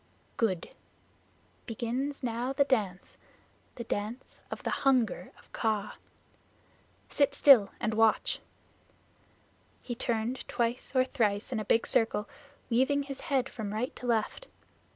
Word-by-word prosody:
"Good. 190 -7 -1 1.0
Begins 255 +5 -3
now 240 +2 -1
the 280 - +4
dance 210 -10 -1 0.6
the 235 - -5
Dance 225 +3 -5
of - - -6
the - - -1
Hunger 260 -5 +2
of - - -21
Kaa. 215 -3 -1 1.1
Sit 280 -1 +1
still 255 -9 +7
and 220 - -1
watch." 225 0 +2 1.4
He 245 - -4
turned 235 +1 -2
twice 240 +2 -2
or 255 0 +5
thrice 220 -5 0
in 240 - -1
a 215 - -4
big 230 +3 +3
circle, 225 -2 +2 0.4
weaving 265 +4 +2
his 275 -1 -7
head 265 -2 +2
from 210 -3 -5
right 245 +4 -2
to 250 - -6
left. 235 - 0
235 Hz, 130 wpm, -30 LUFS, 220-265 Hz, 1.4 s, still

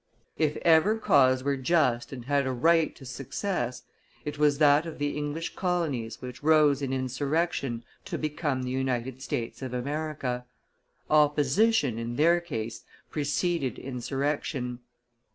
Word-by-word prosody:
"If 155 -2 +1
ever 170 +6 +5
cause 130 -10 +4
were 140 0 0
just 130 -4 +1
and 125 -3 -7
had 140 0 +1
a - - 0
right 160 +5 +3
to 135 - -13
success, 130 - -3 0.4
it 150 0 -5
was 150 -1 +4
that 150 +2 +5
of 165 - -7
the 145 0 -1
English 150 +2 -3
colonies 155 - -2
which 125 -1 -7
rose 150 -2 +4
in 135 -2 -2
insurrection 135 -1 -1 0.2
to - - -3
become 150 -3 -2
the 125 - -3
United 130 -1 -2
States 120 -2 -4
of 130 -1 -4
America. 140 -2 -3 0.6
Opposition, 150 - +3
in 115 +1 -4
their 170 +5 +4
case, 115 -9 -5 0.3
preceded 150 -1 -1
insurrection. 135 0 -3
140 Hz, 135 wpm, -28 LUFS, 125-155 Hz, 0.6 s, ever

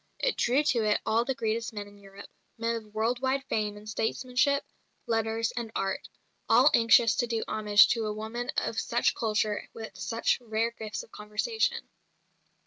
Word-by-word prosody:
It - - 0
drew 260 +5 +2
to 240 -6 +2
it 210 -1 +2
all 225 +1 +2
the 265 - -1
greatest 230 +1 -2
men 205 -1 -6
in 205 0 -16
Europe, 195 0 -13 0.3
men 230 +1 -1
of 215 -2 -8
world 225 +3 0
wide 270 +1 0
fame 210 -5 -2
in 210 - -12
statesmanship, 250 +6 0 0.4
letters, 225 0 0
and 235 -2 -4
art, 195 0 -2 0.4
all - - +6
anxious 230 0 +5
to 240 - +1
do 230 -1 -1
homage 210 -1 +5
to 225 -2 0
a - - -1
woman 220 +3 -5
of - - 0
such - - +1
culture 215 -1 0
and - - -6
with 220 -3 -8
such 230 +6 0
rare 225 0 -1
gifts 215 -2 -6
of - - -18
conversation. 440 - -2
225 Hz, 180 wpm, -28 LUFS, 215-240 Hz, 0.4 s, all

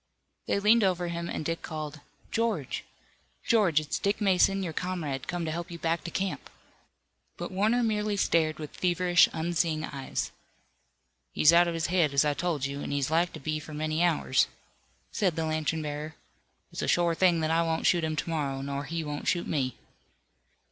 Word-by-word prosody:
They - - +1
leaned 215 +3 +5
over 180 -2 +1
him, 170 0 -4
and 155 - -4
Dick 165 +1 -2
called: 155 -1 -6 0.3
"George! 230 0 -1 0.6
George! 200 -10 +4
It's 155 -1 -3
Dick 200 +1 0
Mason, 195 -1 +3
your 165 -3 -4
comrade, 155 -7 -3
come 175 -1 -2
to 160 - -2
help 170 +1 -4
you 170 - -7
back 165 0 -1
to - - -3
camp!" 190 +2 -3 0.9
But - - -5
Warner 215 +6 +2
merely 210 -2 0
stared 160 -4 +2
with 150 -2 -8
feverish, 175 -1 +4
unseeing 160 -1 -1
eyes. 135 -2 -4 1.0
"He's 155 +2 +5
out 175 +1 +6
of 170 - -2
his 165 0 -1
head, 170 -6 +2
as 140 - +4
I 145 - +2
told 150 -2 -1
you, 140 +1 -4
an' - - -5
he's 140 0 -1
like 170 +2 +2
to - - -7
be 155 +2 -2
for 155 0 -9
many 155 +2 0
hours," 170 -3 +2 0.6
said 185 -6 +1
the 165 -1 -1
lantern 155 0 -1
bearer. 150 +1 -5 0.6
"It's - - -5
a - - -1
shore 175 -1 +3
thing 175 0 +3
that 155 0 0
I 165 +1 +3
won't 165 -1 -1
shoot 175 -3 +3
him 155 -1 -1
to 160 - -3
morrow, 140 -4 -2
nor 140 +1 -3
he 165 +2 -3
won't 145 -1 -5
shoot 175 - +1
me." 130 -5 -1
165 Hz, 190 wpm, -28 LUFS, 155-180 Hz, 1.0 s, out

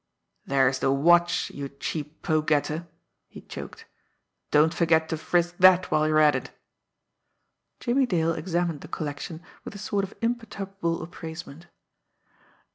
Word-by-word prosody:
"There's 135 -1 +2
the 135 - +2
watch, 175 +5 +3
you 140 -1 -6
cheap 150 +2 -6
poke 155 -1 +1
getter!" 155 +3 0 0.4
he - - -12
choked. - - -9 0.6
"Don't 155 +2 +4
forget 160 -2 +2
to - - 0
frisk 175 +2 0
that 185 0 +6
while 155 0 +3
you're 155 0 +2
at 150 -1 +6
it!" - - -4 1.3
Jimmie 255 +2 +1
Dale 165 -5 +1
examined 170 -1 -2
the - - -9
collection 155 +2 -5 0.2
with - - -8
a - - -6
sort 200 -1 -1
of 195 - -6
imperturbable 195 -7 -3
appraisement. 165 -1 -9
165 Hz, 135 wpm, -26 LUFS, 155-180 Hz, 1.3 s, that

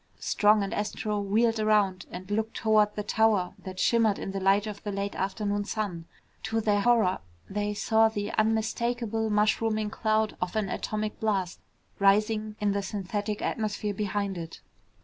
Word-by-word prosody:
Strong 210 0 +3
and 195 - -3
Astro 210 0 -2
wheeled 220 +3 +1
around 205 -4 +2
and 185 +3 -8
looked 220 +1 -1
toward 215 -1 +3
the 210 - -3
tower 210 -4 +2
that 185 -1 -8
shimmered 225 -2 +3
in - - -5
the 195 - -3
light 195 +2 +3
of 210 -2 -6
the 205 - -4
late 200 0 -3
afternoon 205 +1 -1
sun. 200 -6 -3 0.4
To 225 +2 -1
their 210 -2 +2
horror, 225 -5 +3 0.3
they 205 +1 -2
saw 220 +1 +3
the 205 -2 -3
unmistakable 225 +1 0
mushrooming 215 0 +1
cloud 220 -1 0
of 180 +2 -2
an 210 -3 0
atomic 215 +2 -3
blast 195 -5 -1 0.4
rising 215 +2 +2
in 210 -1 +1
the 200 0 0
synthetic 205 +2 -3
atmosphere 210 -1 -2
behind 200 -2 -2
it. 165 -1 -8
210 Hz, 160 wpm, -28 LUFS, 200-220 Hz, 0.4 s, Strong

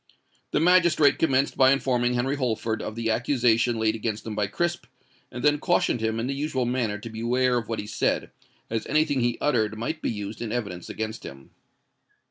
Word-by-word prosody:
The - - +1
magistrate 170 -3 +4
commenced 135 -3 +2
by 130 0 +5
informing 125 -3 +1
Henry 130 +3 0
Holford 115 -4 -1
of 110 - -5
the 115 -1 -1
accusation 120 -1 +2
laid 110 -1 +1
against 110 -1 -4
him 110 - -4
by 105 -1 0
Crisp, 175 +11 -2 0.4
and 120 +1 -6
then 150 0 +3
cautioned 175 -8 +1
him 110 0 -1
in 115 - -1
the 135 - -2
usual 135 -3 -1
manner 120 -4 -1
to 110 +3 -8
beware 125 +3 +1
of 115 - -8
what 115 - -2
he 105 - -4
said, 105 - -1 0.4
as 115 0 -3
anything 150 -2 +2
he 120 0 0
uttered 110 -7 +1
might 155 +8 -3
be - - -1
used 105 0 -5
in 115 -2 -3
evidence 100 -7 -4
against 110 0 -5
him. 70 0 -11
120 Hz, 195 wpm, -25 LUFS, 110-135 Hz, 0.4 s, by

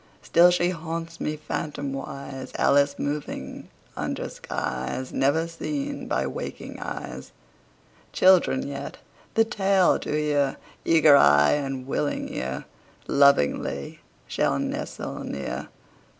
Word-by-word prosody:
Still 175 +1 +6
she 175 0 +2
haunts 165 0 -5
me, 155 0 -2
phantomwise, 140 -2 -5
Alice 140 0 +3
moving 145 - -4 0.3
under - - -3
skies 65 - -4
Never 150 +5 +2
seen 280 - -4
by - - 0
waking - - -6
eyes. - - -6 0.8
Children 185 -7 +4
yet, 140 -1 -6 0.4
the 225 0 +5
tale 195 -4 +3
to - - -7
hear, 145 -2 +1 0.3
Eager 155 -3 +6
eye 75 - +6
and 135 -3 -2
willing 145 +2 -2
ear, 65 +1 -4 0.4
Lovingly 70 - +2 0.3
shall - - +1
nestle - - -4
near. 70 -1 -4
145 Hz, 105 wpm, -25 LUFS, 135-165 Hz, 0.8 s, Still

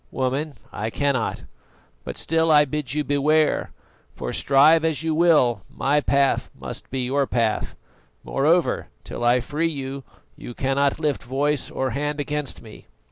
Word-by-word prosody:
"Woman, 135 +3 -2 0.2
I 110 +2 -3
cannot; 140 -2 -1 0.6
but - - -7
still 165 0 +1
I 150 -1 +6
bid 145 -2 -3
you 150 - 0
beware, 150 +2 +1 0.4
for, - - -5
strive 150 +4 +5
as 160 -1 0
you 160 -1 0
will, 155 - +3
my 145 +2 +1
path 140 -1 +1
must - - -7
be 130 0 -2
your 135 +2 0
path. 115 -3 -1 0.5
Moreover, 160 +5 +1 0.2
till - - -6
I 120 +1 +4
free 155 +6 -1
you, 135 -2 -5 0.3
you 120 - -9
cannot 140 +2 0
lift 150 -3 -1
voice 140 +3 -1
or 130 -1 -2
hand 145 +3 -2
against 145 -3 -3
me." 110 -2 -13
140 Hz, 150 wpm, -23 LUFS, 130-150 Hz, 0.6 s, I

